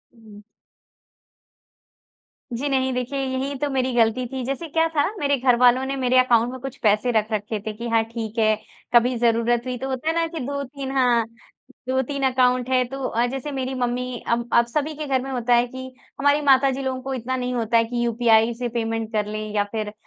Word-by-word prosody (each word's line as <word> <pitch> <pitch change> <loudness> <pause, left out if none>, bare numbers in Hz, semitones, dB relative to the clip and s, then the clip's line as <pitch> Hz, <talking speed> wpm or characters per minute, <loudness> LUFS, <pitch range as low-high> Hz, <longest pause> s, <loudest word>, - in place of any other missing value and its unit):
हुँ। 215 -3 -15 2.1
जी, 255 +5 -2
नहीं 260 -1 +1
देखिए 250 +2 -3
यही 265 +1 -2
तो 290 - -1
मेरी 260 -1 0
गलती 235 +1 +2
थी। 260 +1 -5
जैसे 275 +6 -3
क्या 325 +2 +2
था 290 - +4 0.2
मेरे 285 -2 +1
घरवालों 250 0 +4
ने 270 +1 -2
मेरे 255 -1 +2
अकाउंट 240 -1 +3
में 260 - -7
कुछ 270 0 -7
पैसे 215 +3 +3
रख 220 -1 0
रखे 215 0 -2
थे 215 - -2
कि 235 +3 -6
हाँ 225 -1 +3
ठीक 225 -1 -6
है। 215 -1 +4 0.4
कभी 245 +1 +4
ज़रूरत 235 0 +2
हुई 250 -1 -3
तो 265 +2 -5
होता 260 +3 -4
है - - +1
ना 335 0 +2
कि 325 0 -6
2-3 280 -1 -5
हाँ, 250 -3 +3 0.7
2-3 265 +2 -1
अकाउंट 250 0 +2
है। 255 -1 +3
तो 270 +2 -7
अ, 235 +2 +1
जैसे 270 +3 -5
मेरी 265 -1 -3
मम्मी 250 0 -2
अब 235 0 0
अब 235 - +5
सभी 300 +1 -1
के 305 +1 -5
घर 265 -2 +1
में 270 +1 -6
होता 245 -1 +1
है 240 +1 +3
कि 260 +1 -8 0.3
हमारी 285 +1 +3
माताजी 270 -1 +3
लोगों 260 -1 -2
को 270 +1 -4
इतना 260 0 -3
नहीं 250 0 -2
होता 230 -1 +1
है 230 - +4
कि 240 +1 -2
यूपीआई 230 -1 +3
से 240 +1 -4
पेमेंट 225 -1 -3
कर 210 -1 +1
लें 215 0 -4
या 205 - +3
फ़िर 215 -2 -3
250 Hz, 210 wpm, -23 LUFS, 235-265 Hz, 2.1 s, अब